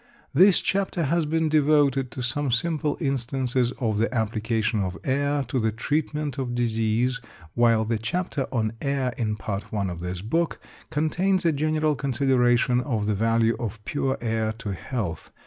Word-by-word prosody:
This 185 +6 +6
chapter 195 -3 0
has 160 +2 +1
been 160 +1 +1
devoted 145 -3 +3
to 125 - -6
some 140 +3 -1
simple 150 +4 0
instances 130 -3 0
of 110 -5 -1
the 115 - +1
application 110 -1 0
of 95 -2 -2
air 140 +1 +1
to 130 - -2
the 110 -1 +1
treatment 150 +3 -2
of 120 -2 -2
disease, 115 +1 0 0.3
while 115 -2 +3
the 115 0 -1
chapter 140 +3 -2
on 110 -3 0
Air 135 -3 0
in 110 -5 -1
Part 105 -1 -4
I 100 -2 -1
of 85 - -6
this 90 +1 -5
book 165 +10 0 0.3
contains 175 +5 +1
a 165 - +5
general 155 +1 +1
consideration 125 -2 +2
of 115 -6 -1
the 105 - +1
value 115 +2 +2
of 110 -2 -5
pure 135 -2 -1
air 110 -1 0
to 110 -3 -5
health. 95 - -4
125 Hz, 165 wpm, -25 LUFS, 110-145 Hz, 0.3 s, This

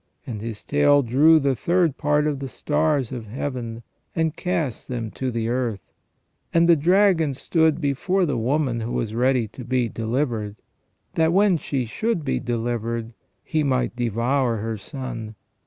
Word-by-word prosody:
And 115 -7 -5
his 110 -2 -6
tail 145 0 +4
drew 150 +7 +5
the 140 -2 +1
third 170 +2 +1
part 150 0 +1
of 150 -3 -1
the 135 - -4
stars 150 -2 0
of 120 -4 -6
Heaven, 120 -1 -5 0.3
and 160 -1 0
cast 170 -9 -2
them 115 -3 -4
to 130 - -3
the 115 -2 -2
earth: 120 -5 -2 0.6
and 170 0 +4
the 170 - +7
dragon 170 -2 +3
stood 160 +2 +2
before 170 +6 +1
the 145 -5 -1
woman 125 +1 0
who 115 +1 -4
was 110 -2 -2
ready 125 0 +2
to 125 - -10
be 125 -1 0
delivered: 115 -2 -2 0.6
that, 160 0 +2
when 195 +1 +4
she 135 -4 -2
should 180 - -2
be 135 - 0
delivered, 115 -1 -2 0.3
he 155 -2 0
might 130 -4 0
devour 120 +1 0
her 110 +1 -3
Son. 115 -1 -7
130 Hz, 160 wpm, -23 LUFS, 115-155 Hz, 0.6 s, the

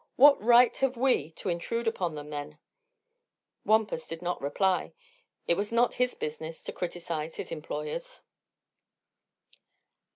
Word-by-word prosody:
What 285 +2 +7
right 240 +2 +6
have 265 -2 0
we 245 - +2
to 185 - -5
intrude 205 +7 -2
upon 180 -8 -1
them, 150 0 -8
then?" 150 0 -6 1.1
Wampus 220 +2 +2
did 165 +1 -6
not 180 0 -2
reply. 180 +7 0 0.5
It - - +3
was 200 +4 -2
not 235 +1 +3
his 250 0 0
business 160 +1 -6
to - - -6
criticise 170 -3 -4
his - - -6
employers. 165 - -5
180 Hz, 130 wpm, -29 LUFS, 160-240 Hz, 1.1 s, What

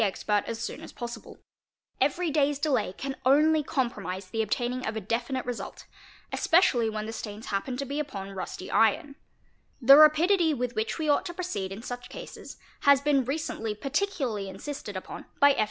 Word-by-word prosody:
expert 210 0 +1
as 230 - -3
soon - - -5
as - - -9
possible; 240 -2 -8 0.6
every 350 -3 +1
day's 290 -1 +2
delay 270 -10 0
can 270 +7 -5
only 305 +4 +5
compromise 200 -9 -3
the 225 - 0
obtaining 245 +4 -1
of 220 - -3
a - - -1
definite 235 +5 -2
result, 245 -1 -6 0.5
especially 255 -10 +3
when 215 0 -4
the 225 - -5
stains 215 0 -7
happen 225 +6 -2
to 275 - -3
b 280 +3 -3
upon 200 -10 -5
rusty 185 -1 -6
iron 225 +6 +3 0.7
8), 250 - -12
The 275 - +12
rapidity 320 +2 +5
with 250 -1 -2
which 220 +1 -1
we 315 -2 -2
ought 295 +5 +2
to 345 - -7
proceed 205 - -3
m 205 +4 -7
such 245 0 -6
cases - - -9 0.2
has 280 -1 +6
been 280 -2 +2
recently 260 -6 -3
particularly 270 - -2
insisted 205 0 -6
upon 185 - -8
by 285 0 +7
F. 275 - -1
250 Hz, 180 wpm, -28 LUFS, 215-290 Hz, 0.7 s, The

